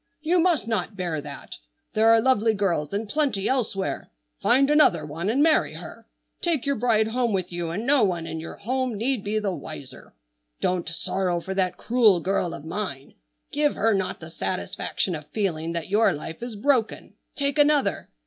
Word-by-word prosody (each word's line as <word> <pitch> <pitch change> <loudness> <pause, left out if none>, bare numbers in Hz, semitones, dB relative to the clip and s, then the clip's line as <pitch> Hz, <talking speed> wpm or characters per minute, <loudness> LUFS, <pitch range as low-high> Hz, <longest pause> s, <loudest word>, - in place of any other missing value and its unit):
You 345 +3 +3
must 325 - +2
not 210 -2 -2
bear 170 -5 -2
that. 145 -1 -9 0.4
There 220 +1 +4
are 225 0 +7
lovely 225 -3 +3
girls 170 -7 0
in 205 +3 -2
plenty 270 -5 0
elsewhere. 220 -7 -1 0.3
Find 275 +2 +4
another 195 - +4
one 165 +6 -3
and 265 +6 +3
marry 315 -1 +3
her. - - -10 0.3
Take 330 -7 0
your 280 0 +1
bride 220 -2 +2
home 240 -1 0
with 185 -2 -1
you, 175 -1 -3
and 200 +8 -3
no 280 0 +4
one 175 -4 0
in 160 - -5
your 165 - -7
home 250 +1 -2
need 235 0 0
be 210 +2 -1
the 210 -2 0
wiser. 135 - -9 0.4
Don't 180 -2 0
sorrow 175 +1 -1
for 190 +3 -5
that 185 -2 0
cruel 225 -6 +4
girl 175 -1 -1
of 145 - -10
mine. 160 -6 -5 0.4
Give 295 0 +1
her 225 +1 +2
not 190 -2 -1
the 160 0 -10
satisfaction 185 +1 -2
of 150 -2 -6
feeling 165 -6 -2
that 170 +1 -4
your 205 -1 +4
life 160 +4 -7
is 240 -2 -5
broken. 245 0 0 0.2
Take 280 +1 -1
another. 290 -1 +2
205 Hz, 185 wpm, -25 LUFS, 175-250 Hz, 0.4 s, are